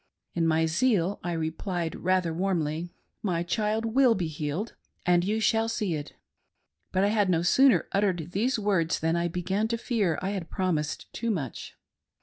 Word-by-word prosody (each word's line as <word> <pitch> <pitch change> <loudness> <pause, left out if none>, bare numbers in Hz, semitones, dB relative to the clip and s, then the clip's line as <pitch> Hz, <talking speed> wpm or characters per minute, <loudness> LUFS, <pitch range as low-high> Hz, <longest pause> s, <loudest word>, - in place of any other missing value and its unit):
In 165 -1 +1
my 160 0 +3
zeal 195 +1 +1
I 175 -1 -2
repUed 165 +1 -2
rather 180 -2 +1
warmly: 170 -2 -1 0.2
" - - -50
My 170 0 0
child 215 +5 0
will 240 +1 +4
be 180 - -1
healed, 155 +7 -3 0.3
and 175 -1 +4
you 210 +4 0
shall 225 +1 +2
see 210 -6 -1
it." 145 -2 -5 0.8
But 190 +1 +2
I 200 - +3
had 205 -3 +2
no 170 -2 +2
sooner 260 +8 +4
"uttered 185 -5 0
these 230 +8 +1
words 195 -6 +1
than 165 +1 +1
I 170 0 +1
began 185 +5 -1
to 230 +1 -1
fear 210 - 0
I 190 +2 -2
had 185 -5 -4
promised 160 -5 -2
too 235 - -2
much. 150 - -4
185 Hz, 175 wpm, -27 LUFS, 165-210 Hz, 0.8 s, will